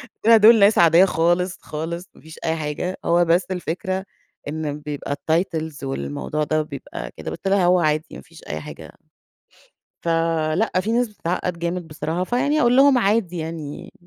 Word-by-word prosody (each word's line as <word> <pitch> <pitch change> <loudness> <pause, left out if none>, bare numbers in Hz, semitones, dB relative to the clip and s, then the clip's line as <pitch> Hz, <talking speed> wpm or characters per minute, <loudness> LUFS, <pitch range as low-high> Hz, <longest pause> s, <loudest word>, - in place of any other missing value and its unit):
قُلت - - -7
لها: 230 -1 +8
"دول 220 +1 +7
ناس 200 +2 +5
عادية 170 +2 +6
خالص 175 +1 +1
خالص، 170 +3 -6
مافيش 160 0 -13
أي 160 0 +1
حاجة، 155 +4 -3
هو 170 +1 +3
بس 175 +2 +2
الفكرة 185 +2 -3 0.4
إن 150 -1 -4
بيبقى 145 -1 -5 0.2
الtitles 160 -4 -1
والموضوع 70 - -3
ده 155 0 +1
بيبقى 135 - -7
كده." - - -6
قُلت - - -6
لها: 195 -2 +3
"هو 180 0 +4
عادي 155 -1 +1
ما 70 - -9
فيش - - -17
أي 75 - -3
حاجة." - - -10 1.1
فَلأ 165 +3 +1
في 220 +4 -2
ناس 240 0 +1
بتتعقد 180 -3 -3
جامد 170 0 -3
بصراحة، 160 +3 -3
فيعني 285 +8 +1
أقول 240 +1 +4
لهم 270 -1 +6
عادي 195 -5 +1
يعني 160 +2 -6
170 Hz, 165 wpm, -22 LUFS, 155-190 Hz, 1.1 s, لها